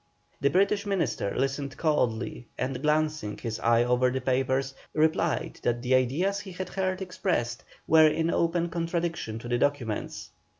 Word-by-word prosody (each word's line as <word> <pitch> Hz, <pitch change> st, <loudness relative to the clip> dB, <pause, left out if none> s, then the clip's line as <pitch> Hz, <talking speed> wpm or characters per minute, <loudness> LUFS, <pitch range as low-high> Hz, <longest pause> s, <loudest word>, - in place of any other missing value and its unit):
The 140 Hz, -, +3 dB
British 200 Hz, +5 st, +2 dB
Minister 170 Hz, -, -1 dB
listened 135 Hz, 0 st, -2 dB
coldly, 120 Hz, -6 st, 0 dB
and 130 Hz, 0 st, -2 dB
glancing 150 Hz, -6 st, 0 dB
his 110 Hz, -2 st, -4 dB
eye 115 Hz, 0 st, +4 dB
over 125 Hz, +1 st, +3 dB
the 130 Hz, +1 st, -1 dB
papers, 130 Hz, +1 st, 0 dB, 0.2 s
replied 160 Hz, +1 st, +1 dB
that 120 Hz, 0 st, 0 dB
the 130 Hz, +1 st, +1 dB
ideas 150 Hz, +11 st, +2 dB
he 195 Hz, -2 st, -9 dB
had 185 Hz, 0 st, -5 dB
heard 190 Hz, 0 st, -1 dB
expressed 165 Hz, -10 st, -2 dB, 0.2 s
were 160 Hz, 0 st, +7 dB
in 160 Hz, +2 st, +1 dB
open 170 Hz, 0 st, +1 dB
contradiction 165 Hz, -8 st, -2 dB
to 115 Hz, -, -8 dB
the 120 Hz, 0 st, 0 dB
documents. 125 Hz, -7 st, -2 dB
145 Hz, 155 wpm, -27 LUFS, 125-170 Hz, 0.2 s, were